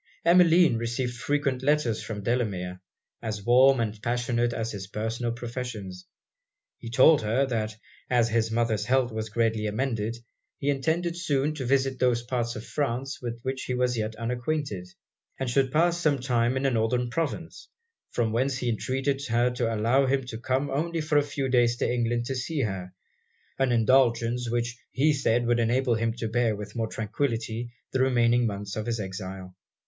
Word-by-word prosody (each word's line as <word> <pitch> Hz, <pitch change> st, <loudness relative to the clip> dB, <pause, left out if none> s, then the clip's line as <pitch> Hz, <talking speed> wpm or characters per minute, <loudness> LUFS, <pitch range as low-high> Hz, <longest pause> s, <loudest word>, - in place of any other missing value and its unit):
Emmeline 170 Hz, -5 st, +6 dB
received 120 Hz, +2 st, -2 dB
frequent 140 Hz, +1 st, -1 dB
letters 135 Hz, -5 st, +1 dB
from 105 Hz, -2 st, -6 dB
Delamere, 95 Hz, -7 st, -1 dB, 0.4 s
as 105 Hz, -3 st, -4 dB
warm 130 Hz, +2 st, +6 dB
and 110 Hz, -2 st, -2 dB
passionate 120 Hz, +1 st, 0 dB
as 115 Hz, -1 st, -3 dB
his 95 Hz, -2 st, -6 dB
personal 115 Hz, +3 st, -2 dB
professions. 115 Hz, -6 st, -6 dB, 0.7 s
He 115 Hz, -, -7 dB
told 135 Hz, +6 st, +6 dB
her, 115 Hz, +6 st, +1 dB
that 110 Hz, -4 st, -2 dB, 0.3 s
as 120 Hz, -2 st, +3 dB
his 110 Hz, 0 st, +1 dB
mother's 110 Hz, -2 st, 0 dB
health 125 Hz, 0 st, +2 dB
was 110 Hz, 0 st, -4 dB
greatly 110 Hz, -1 st, 0 dB
amended, 115 Hz, 0 st, -2 dB, 0.4 s
he 145 Hz, +1 st, 0 dB
intended 165 Hz, +5 st, 0 dB
soon 150 Hz, -4 st, 0 dB
to 135 Hz, -5 st, -4 dB
visit 135 Hz, 0 st, +1 dB
those 120 Hz, -2 st, +2 dB
parts 120 Hz, -1 st, -2 dB
of 110 Hz, -, -7 dB
France 135 Hz, -1 st, -2 dB
with 120 Hz, -1 st, -5 dB
which 130 Hz, 0 st, -3 dB
he 125 Hz, -, -2 dB
was 125 Hz, 0 st, +1 dB
yet 110 Hz, -1 st, -2 dB
unacquainted; 120 Hz, -3 st, -3 dB, 0.5 s
and 135 Hz, -, -2 dB
should 130 Hz, +1 st, +2 dB
pass 170 Hz, +3 st, +2 dB
some 150 Hz, -4 st, +3 dB
time 125 Hz, -1 st, +1 dB
in 130 Hz, -, -2 dB
the 135 Hz, -, +2 dB
Northern 120 Hz, +1 st, 0 dB
Provinces, 165 Hz, +5 st, -3 dB, 0.4 s
from 115 Hz, -2 st, 0 dB
whence 130 Hz, +4 st, 0 dB
he 125 Hz, -2 st, -1 dB
entreated 135 Hz, +4 st, -1 dB
her 120 Hz, +1 st, +2 dB
to 120 Hz, -2 st, -1 dB
allow 115 Hz, +5 st, +2 dB
him 135 Hz, 0 st, +1 dB
to 115 Hz, -2 st, -6 dB
come 130 Hz, +3 st, -1 dB
only 165 Hz, +4 st, -1 dB
for 150 Hz, -1 st, +3 dB
a -, -, +3 dB
few 140 Hz, -1 st, -3 dB
days 120 Hz, -2 st, +3 dB
to -, -, 0 dB
England 120 Hz, -1 st, 0 dB
to 135 Hz, -, -2 dB
see 140 Hz, +4 st, -2 dB
her 95 Hz, -5 st, -3 dB, 0.7 s
an 135 Hz, -2 st, +2 dB
indulgence 120 Hz, 0 st, +3 dB
which 120 Hz, 0 st, -1 dB
he 150 Hz, +3 st, +2 dB
said 120 Hz, -4 st, +1 dB
would 120 Hz, 0 st, +2 dB
enable 120 Hz, +2 st, +2 dB
him 115 Hz, 0 st, 0 dB
to 115 Hz, -1 st, -4 dB
bear 115 Hz, -1 st, +1 dB
with 105 Hz, 0 st, -8 dB
more 115 Hz, -1 st, -1 dB
tranquillity 115 Hz, +1 st, -3 dB, 0.2 s
the 130 Hz, -, 0 dB
remaining 120 Hz, -2 st, +3 dB
months 100 Hz, -1 st, -5 dB
of 110 Hz, +1 st, -4 dB
his 115 Hz, -1 st, -1 dB
exile. 95 Hz, -1 st, -6 dB
120 Hz, 175 wpm, -27 LUFS, 115-135 Hz, 0.7 s, Emmeline